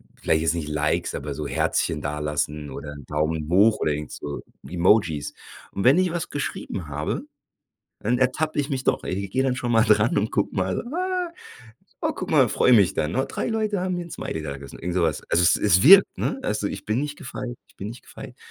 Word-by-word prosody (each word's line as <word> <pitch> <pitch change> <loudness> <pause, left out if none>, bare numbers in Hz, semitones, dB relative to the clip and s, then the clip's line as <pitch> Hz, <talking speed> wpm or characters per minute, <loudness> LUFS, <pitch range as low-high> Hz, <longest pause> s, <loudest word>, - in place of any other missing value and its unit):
vielleicht 80 0 +1
jetzt 80 - +2
nicht 80 -3 -3
Likes, 75 0 0
aber 75 - -4
so 75 +1 -4
Herzchen 75 +1 0
dalassen 75 0 -2
oder 70 +2 -7
'n 70 -1 -10
Daumen 75 +1 -1
hoch 105 +5 +4
oder 75 - +1
irgend 75 0 -5
so 70 0 -6 0.3
Emojis. 85 -4 +2 0.4
Und 100 - -3
wenn 135 +6 +6
ich 185 -1 +2
was 170 0 -3
geschrieben 100 - -4
habe, 75 +1 -3 0.8
dann 120 +3 +1
ertappe 140 +5 0
ich 140 - -3
mich 130 -1 -2
doch - - +1
i - - -6
ich 100 +1 -3
gehe 130 +6 +1
dann 130 -1 0
schon 120 -1 -2
mal 115 -1 +5
dran 105 +1 +3
und 110 - 0
guck 100 - 0
mal: 95 -1 -1
„Ah. 365 -1 -1 0.7
Oh, - - +1
guck - - -5
mal!”, - - +5
freue 125 - +3
mich 100 -6 +5
dann. 75 +1 -1
„Na, 130 - +1
3 - - -3
Leute 215 -3 -1
haben 185 -1 -1
mir 175 - -4
'n - - -14
Smiley 80 - -5
dagelassen!”, 70 -2 -7
irgend 90 +1 -3
so 90 - +2
was. 80 -3 -1
Also 85 - +3
es - - +5
es 95 -3 +3
wirkt, 195 +6 +8
ne? - - -1
Also 105 - -1
ich 100 0 -7
bin 110 +4 0
nicht 145 0 -4
gefeit, 125 -2 -6
ich - - -26
bin 100 - -6
nicht 115 +3 -9
gefeit. - - -11
100 Hz, 225 wpm, -24 LUFS, -, 0.8 s, wirkt